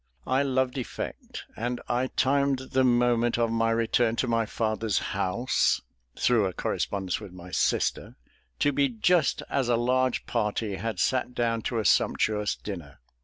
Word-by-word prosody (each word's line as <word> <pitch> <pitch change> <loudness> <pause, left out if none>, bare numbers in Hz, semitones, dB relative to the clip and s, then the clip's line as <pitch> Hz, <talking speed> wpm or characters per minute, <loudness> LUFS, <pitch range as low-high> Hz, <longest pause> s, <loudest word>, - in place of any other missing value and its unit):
I 130 +2 +2
loved 130 -1 0
effect; 125 - -6
and 120 +2 -3
I 125 +2 0
timed 140 +1 +1
the 130 -1 +3
moment 120 -1 +3
of 115 -1 +1
my 115 0 +1
return 115 0 +2
to 125 - 0
my 115 -2 +1
father's 110 -1 -1 0.2
house 100 +6 +1 0.4
(through 115 -5 +3
a 95 - -5
correspondence 95 +1 -2
with 105 -4 -10
my 90 0 -11
sister) - - 0 0.4
to 145 - +2
be 140 0 +2
just 140 +7 +2
as 130 -3 0
a 120 - +4
large 130 +2 +1
party 105 -3 -1
had 115 +3 -4
sat 125 -1 0
down 115 -1 0
to 120 - -2
a 110 - -1
sumptuous 105 -1 +2
dinner. 85 -9 -8
115 Hz, 160 wpm, -27 LUFS, 110-130 Hz, 0.4 s, a